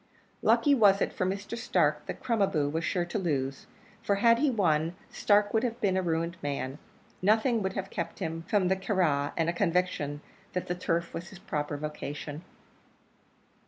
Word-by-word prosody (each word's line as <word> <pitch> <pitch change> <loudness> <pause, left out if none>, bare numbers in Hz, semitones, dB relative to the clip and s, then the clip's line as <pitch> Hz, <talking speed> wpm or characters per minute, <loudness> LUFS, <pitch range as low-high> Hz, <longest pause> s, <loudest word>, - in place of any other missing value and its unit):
Lucky 290 - +4
was 205 -6 +5
it - - 0
for 185 - -1
Mr. 200 +4 -3
Stark 230 - +1
that - - -6
Crom 230 -4 +1
a 195 - +5
boo 150 -5 0
was 160 +3 -2
sure 175 +1 0
to 175 +5 -3
lose; 135 -7 -2 0.3
for 200 - +1
had 230 +3 +4
he 295 +1 +3
won, 170 -7 +1 0.2
Stark 205 0 +3
would 220 - +3
have 235 -1 -2
been 195 -3 +1
a 190 - +2
ruined 170 0 -1
man; 140 0 -3 0.4
nothing 220 +4 +3
would 190 -1 -1
have 195 -1 -4
kept - - -4
him 165 -3 -3
from 200 -3 +2
the 190 - +3
Curragh 175 -8 +1
and 165 -1 +1
a 170 - +1
conviction 170 -5 0 0.3
that 180 - -2
the 180 - -2
turf 170 -1 -2
was 170 +1 -5
his 195 - -11
proper 150 -5 -3
vocation. 150 +1 -6
180 Hz, 190 wpm, -29 LUFS, 155-205 Hz, 0.4 s, was